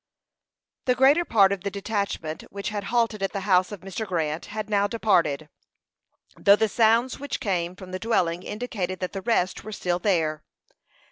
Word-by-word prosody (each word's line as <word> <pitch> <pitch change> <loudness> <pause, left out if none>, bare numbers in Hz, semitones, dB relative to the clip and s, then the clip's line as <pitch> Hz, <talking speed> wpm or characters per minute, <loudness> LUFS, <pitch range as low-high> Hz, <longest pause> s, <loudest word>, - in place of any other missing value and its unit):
The 250 - +3
greater 275 +6 +5
part 205 - +4
of 200 -2 -2
the 200 - -2
detachment 200 -5 -3
which 200 0 -4
had 205 -2 -4
halted 230 -3 0
at 195 - -1
the 200 - -2
house 185 -1 +3
of 205 -4 -7
Mr. 195 +3 -5
Grant 160 -3 -2
had 215 0 -5
now 205 -1 +2
departed, 175 -9 +1 0.9
though 200 0 +6
the 220 +1 +2
sounds 230 +4 +2
which 285 0 -4
came 180 -3 -1
from 185 0 -11
the 185 - -4
dwelling 180 -6 0
indicated 200 -4 -4
that 185 -2 -4
the 195 - -4
rest 190 -4 0
were 215 - -7
still 180 -4 -1
there. 160 -6 0
200 Hz, 180 wpm, -25 LUFS, 180-220 Hz, 0.9 s, though